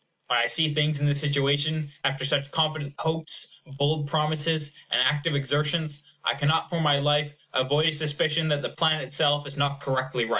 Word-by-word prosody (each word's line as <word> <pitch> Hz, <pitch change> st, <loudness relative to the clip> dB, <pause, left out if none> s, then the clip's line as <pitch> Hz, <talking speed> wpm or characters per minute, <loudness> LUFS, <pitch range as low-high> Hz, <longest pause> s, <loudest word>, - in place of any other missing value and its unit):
When -, -, +2 dB
I -, -, +2 dB
see 160 Hz, -2 st, +2 dB
things 150 Hz, -1 st, +1 dB
in 145 Hz, -, 0 dB
this 145 Hz, 0 st, +2 dB
situation 145 Hz, +1 st, +1 dB, 0.2 s
after 135 Hz, 0 st, -1 dB
such 140 Hz, 0 st, 0 dB
confident 155 Hz, -3 st, -1 dB
hopes, 160 Hz, 0 st, -1 dB, 0.3 s
bold 145 Hz, +1 st, 0 dB
promises, 155 Hz, 0 st, 0 dB, 0.2 s
and -, -, +2 dB
active 150 Hz, +1 st, +1 dB
exertions, 150 Hz, +2 st, 0 dB, 0.2 s
I -, -, +2 dB
cannot, 145 Hz, +3 st, 0 dB
for 170 Hz, -, -1 dB
my 145 Hz, -2 st, +3 dB
life, 150 Hz, +1 st, +1 dB, 0.2 s
avoid 140 Hz, +4 st, +2 dB
a -, -, +4 dB
suspicion 155 Hz, +1 st, +1 dB
that 145 Hz, -2 st, 0 dB
the -, -, -2 dB
plan 160 Hz, -2 st, +1 dB
itself 145 Hz, +2 st, +1 dB
is 140 Hz, 0 st, -8 dB
not 140 Hz, 0 st, 0 dB
correctly 130 Hz, -3 st, -1 dB
right. -, -, -7 dB
145 Hz, 185 wpm, -25 LUFS, 140-155 Hz, 0.3 s, a